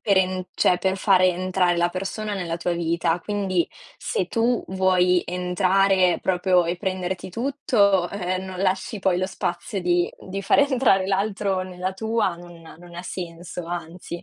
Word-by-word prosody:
per 200 -3 +2
en 185 -1 0
cioè 180 - +3
per 190 +1 0
fare 190 -1 +4
entrare 180 0 +1
la 175 0 +2
persona 200 +3 -4
nella 175 -4 -3
tua 175 +1 -1
vita. 170 0 0
Quindi 195 -3 -1 0.3
se 185 - -2
tu 230 +5 0
vuoi 185 -1 +3
entrare 185 +1 +2
proprio 180 -1 +2
e 170 +1 -2
prenderti 185 0 -3
tutto, 210 -6 +1
eh 185 -2 -3
eh, - - -1
non 185 -1 -7
lasci 190 +3 -1
poi 190 -2 +1
lo 185 +1 0
spazio 190 +2 -3
di 175 -1 +1 0.2
di 195 +1 -4
far 195 - +3
entrare 260 -9 +3
l'altro 195 -1 0
nella 185 0 -4
tua, 220 -1 0
non 175 0 -13 0.2
non 175 0 -14
ha 175 - -5
senso, 175 -1 -6
anzi, 170 0 -6
185 Hz, 165 wpm, -23 LUFS, 175-195 Hz, 0.3 s, fare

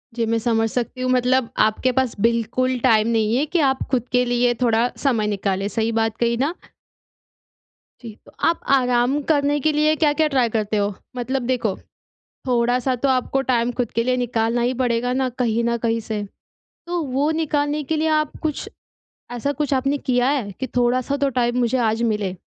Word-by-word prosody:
जी, 230 - 0
मैं 230 +1 0
समझ 225 -1 +1
सकती 250 +1 -3
हूँ 255 - 0
मतलब 255 -1 +2 0.2
आपके 235 +4 0
पास 260 -3 +1
बिल्कुल 235 +3 +1
टाइम 220 -3 +4
नहीं 225 0 +1
है 290 - +1
कि 340 +3 -1
आप 265 - -1
खुद 250 -1 0
के 250 0 +3
लिए 245 0 +2
थोड़ा 235 0 +3
समय 230 -7 0
निकाले, 195 -1 -1
सही 225 0 -1
बात 225 -1 -1
कही 235 0 +1
ना? 285 +7 0 1.5
जी। 230 -3 -8
तो - - -16 0.2
आप 330 - +1
आराम 250 +2 +2
करने 290 -1 +2
के 310 +3 +1
लिए 305 +1 +2
क्या-क्या 305 +1 +3
ट्राई 245 -3 +3
करते 215 -1 -1
हो? 205 0 0 0.2
मतलब 255 +2 -2
देखो, 235 -6 0 0.7
थोड़ा-सा 245 +1 +1
तो - - +4
आपको 260 +1 +1
टाइम 240 -1 +2
खुद 240 - -1
के - - +4
लिए 255 0 +1
निकालना 235 -1 0
ही 250 +2 0
पड़ेगा 245 0 0
ना 260 - +1
कहीं 230 0 +1
न 235 0 +1
कहीं 230 0 +1
से। 215 -1 -2 0.7
तो 350 -1 -1
वो 275 +2 0
निकालने 295 -1 -1
के - - +3
लिए 315 +1 +1
आप 305 -1 -4
कुछ, 305 -2 -3 0.6
ऐसा 245 +4 -2
कुछ 285 -1 0
आपने 275 +2 0
किया 250 -1 +1
है? 255 -8 -1
कि 260 - -5
थोड़ा-सा 250 +3 +1
तो 280 0 +1
टाइम 240 +1 0
मुझे 245 +1 +1
आज 225 +2 -2
मिले। 200 -3 -2
245 Hz, 190 wpm, -21 LUFS, 230-270 Hz, 1.5 s, टाइम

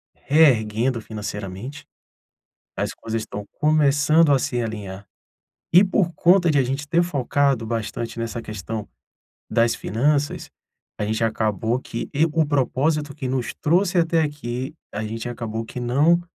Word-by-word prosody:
reerguendo 125 -5 +3
financeiramente, 105 +4 -6 0.9
as - - -1
coisas 115 0 -4
estão 105 -1 -7
começando 150 +1 +4
a 135 - +4
se 120 0 -1
alinhar. 100 -3 -6 0.7
E 180 +3 +8
por 185 -2 +1
conta 175 +2 +4
de 145 - +2
a - - +3
gente 135 +3 -3
ter 170 +2 +3
focado 140 -5 +1
bastante 115 +1 -4
nessa 115 0 -3
questão 105 0 -6 0.6
das 115 +1 +3
finanças, 140 +7 0 0.5
a - - -1
gente 110 +1 -1
acabou 110 +1 0
que 115 - -5
e 150 +3 +4
o 160 -1 +2
propósito 145 +1 0
que 135 -4 -4
nos 130 -1 -2
trouxe 180 +4 +2
até 165 -1 +3
aqui, 140 -1 -4 0.2
a 105 +2 -3
gente 115 +2 -4
acabou 115 -2 -4
que 115 - -8
não, 145 +8 +3
130 Hz, 145 wpm, -23 LUFS, 110-150 Hz, 0.9 s, E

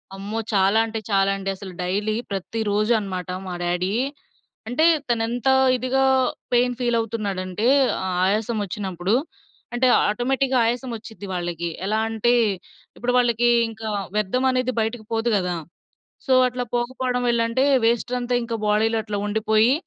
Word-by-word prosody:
అమ్మో 205 +3 -4
చాలా 195 +3 +4
అంటే 225 0 -4
చాలా 195 0 +3
అండి 195 0 -4
అసలు. 190 -1 -9
డైలీ 205 +4 -1 0.2
ప్రతిరోజన్నమాట 205 -2 -1 0.2
మా 180 - -4
డాడీ. 180 +3 -1 0.7
అంటే 310 +7 +2 0.2
తనేంత 235 +2 -1 0.3
ఇదిగా 255 +2 0 0.5
పెయిన్ 245 0 +3
ఫీల్ 240 -1 +1
అవుతున్నాడంటే, 210 -2 -2 0.4
ఆ - - -2 0.2
ఆయాసం 215 +3 0
వచ్చినప్పుడు 190 0 -2 0.6
అంటే, 255 +1 +2 0.2
ఆటోమేటిక్‌గా 260 +4 0
ఆయాసం 245 +2 -1
వచ్చిద్ది 215 -3 -10
వాళ్ళకి 175 -1 -3 0.2
ఎలా 215 +2 0
అంటే, 225 +2 +1 0.6
ఇప్పుడు 245 +1 -1
వాళ్ళకి 240 -1 +3 0.2
ఇంకా 220 0 -8 0.3
వ్యర్థం 210 +5 0
అనేది 255 0 0
బయటకి 225 +1 -2
పోదు 225 +1 0
గదా! 180 -2 0 0.7
సో, 265 - +1 0.2
అట్లా 250 0 -4
పోకపోవడం 250 +1 -1
వెల్లంటే 235 +2 +1 0.2
వేస్టంతా 245 +1 0
ఇంకా 230 -1 -3
బాడీలో 220 +2 +2
అట్లా 205 -1 -4
ఉండిపోయి, 220 +3 +2
225 Hz, 130 wpm, -23 LUFS, 200-240 Hz, 0.7 s, చాలా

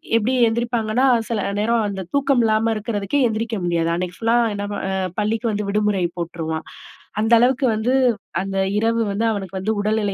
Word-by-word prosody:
எப்படி 230 +3 +2
எந்திரிப்பாங்கன்னா, 235 +1 0 0.2
சில 230 -2 -1 0.2
நேரம் 225 +1 +1
அந்த 195 -1 -4
தூக்கம் 275 -3 +3
இல்லாம 220 +1 +2
இருக்கிறதுக்கு 210 +3 -2
எந்திரிக்க 225 0 -2
முடியாது. 170 -1 0
அன்னைக்கு 180 +1 -4
ஃபுல்லா 230 +1 +2 0.2
என்ன 205 0 -4
ப - - -3
அ - - -1 0.3
பள்ளிக்கு 225 +2 0
வந்து 210 -1 -2
விடுமுறை 210 -3 +1
போட்டுருவான். 165 -2 -4 0.6
அந்த 225 +2 +2
அளவுக்கு 255 +2 +3
வந்து, 225 +4 0 0.5
அந்த 195 0 -4 0.2
இரவு 230 +2 +1
வந்து 210 +3 -1
அவனுக்கு 195 -3 -5
வந்து 200 +4 -1
உடல்நிலை 210 -1 0
215 Hz, 165 wpm, -21 LUFS, 200-230 Hz, 0.6 s, தூக்கம்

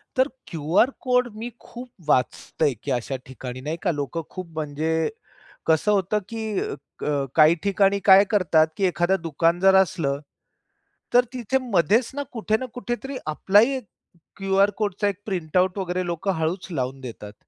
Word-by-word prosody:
तर 260 +2 +3 0.2
QR 165 - +2
code 250 -1 +2
मी 230 +3 -5
खूप 245 +1 -10 0.2
वाचतोय, 135 +3 +1
की 135 +6 -6
अशा 125 +2 -1
ठिकाणी 130 0 -8
नाही 155 +4 -3
का 175 - +2
लोक 145 0 -4
खूप 185 -2 -6
म्हणजे, 160 +2 -1 0.6
कसं 160 +6 +3
होतं 200 +1 +1
की 225 -1 -5 0.6
क 145 -2 0
काही 155 +1 +6
ठिकाणी 200 0 +2
काय 195 0 +8
करतात 165 -6 +4
की 195 - -2
एखादं 180 0 +1
दुकान 165 +2 +1
जर 190 0 +5
असलं, 155 -7 +2 0.9
तर 245 0 +6
तिथे 255 +1 0
मध्येच 210 +8 +3
ना 285 - -2
कुठे 220 -1 0
ना 255 - -5
कुठेतरी 250 +2 -4
आपला 190 +6 +3
ही 265 +5 +3
एक 255 - -9 0.5
क्यू 195 0 -1
आर 205 - +4
कोडचा 205 -1 0
एक 200 0 -3
प्रिंटआउट 185 0 0
वगैरे 185 -1 -2
लोक 170 +2 -4
हळूच 175 +2 -1
लावून 135 -2 -3
देतात. 105 -4 -8
185 Hz, 160 wpm, -24 LUFS, 155-210 Hz, 0.9 s, काय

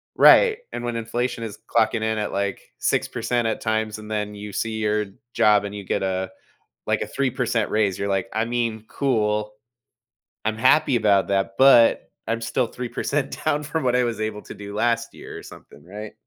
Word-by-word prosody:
right, 465 -2 +7
and 120 - -5
when 120 -1 -2
inflation 115 +1 -2
is 110 -3 -6 0.2
clocking 115 0 +4
in 110 0 0
at, 105 - -2
like, 100 0 -2 0.2
6% 120 0 0
at 110 - -2
times 110 -1 -1
and 110 0 -10
then 105 -1 -2
you 105 -1 -8
see 115 -1 -2
your 105 0 +1 0.3
job 105 -1 +4
and 100 0 -6
you 100 - -6
get 95 - -1
a, 95 0 -1 0.6
like, - - 0
a - - -2
3% 125 -5 -1
raise, 105 -3 +1
you're 100 0 -2
like, 95 -1 0
"I 110 +1 0
mean, 115 -2 -2
cool, 105 -5 0 0.9
I'm 110 0 0
happy 130 +2 +4
about 105 -4 +3
that, 95 0 0
but 130 -4 +6 0.2
I'm 115 0 0
still 115 +1 0
3% 130 +3 -3
down 150 -1 +1
from 155 +1 -3
what 125 -1 +2
I 125 - +3
was 115 -2 -3
able 110 -1 -3
to - - -9
do 100 0 -8
last 115 +1 0
year," - - -10
or - - -10
something, 70 - -14
right? 105 +4 -8
110 Hz, 190 wpm, -23 LUFS, 105-120 Hz, 0.9 s, right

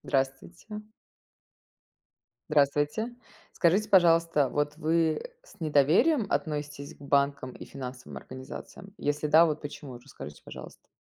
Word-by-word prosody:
Здравствуйте. 145 +10 -3 1.7
Здравствуйте. 150 - +1 0.4
Скажите, 190 +5 +3
пожалуйста, 165 - +5
вот 145 +2 -1
вы 160 0 +1 0.2
с - - -19
недоверием 165 - +4
относитесь 145 -2 -3
к - - -27
банкам 140 -2 +1
и - - -10
финансовым 125 -2 -8
организациям? 130 +8 -10
Если 145 +1 -1
да, 160 +3 +7
вот 155 -2 -1
почему, 145 -3 -8
расскажите, 120 - -11
пожалуйста. - - -11
150 Hz, 110 wpm, -28 LUFS, 140-170 Hz, 1.7 s, да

